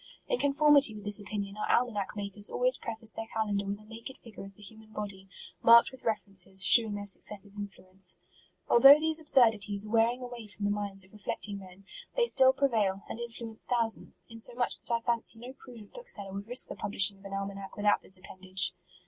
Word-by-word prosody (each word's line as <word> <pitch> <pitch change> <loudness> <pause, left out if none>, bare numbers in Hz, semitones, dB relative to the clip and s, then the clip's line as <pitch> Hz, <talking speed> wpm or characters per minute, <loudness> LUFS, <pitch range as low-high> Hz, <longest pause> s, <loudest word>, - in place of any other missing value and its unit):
In - - -1
conformity 285 -4 +4
with 210 - -10
this 205 +1 0
opinion, 200 -1 -6
our 210 - -4
almanac 215 -5 -1
makers 205 0 -1
always - - 0
preface 225 -1 -4
their 225 0 -7
calendar 210 -3 -3
with 200 +1 -4
a 210 - -19
naked 230 +4 -10
figure 230 -4 -13
of 195 0 -13
the 210 - -16
human 220 +2 -15
body, 195 -3 -8 0.3
marked 235 +2 +6
with 260 - -14
references, 195 -3 +2
shewing 220 -3 +5
their 205 0 -6
successive 200 0 -5
influence. 190 -2 -2 0.5
Although 275 +4 +8
these 320 0 +1
absurdities 220 -8 +2
ire 210 - -10
wearing 235 +2 +1
a - - -5
way 240 -3 -10
from 205 0 -7
the 205 - 0
minds 200 -2 -2
of 190 - -25
reflecting 205 -1 -5
men, 190 0 -15 0.3
they 485 - +2
still 260 - +4
prevail, 220 -8 -1
and - - -8
influence 230 -1 -5
thousands, 230 -3 +1
inso 230 +1 -8
much 245 - +1
that - - -8
I 235 0 0
fancy 235 -1 -2
no 245 +3 -10
prudent 235 -6 -15
bookseller 205 - -1
would 200 +1 -7
risk 245 +2 +5
the - - -7
publishing 200 0 +2
of 195 - -20
an 195 - -9
almanac 195 0 -7
with 205 - -5
out 205 - +3
this 190 - +3
appendage. 185 0 -3
210 Hz, 205 wpm, -29 LUFS, 200-235 Hz, 0.5 s, Although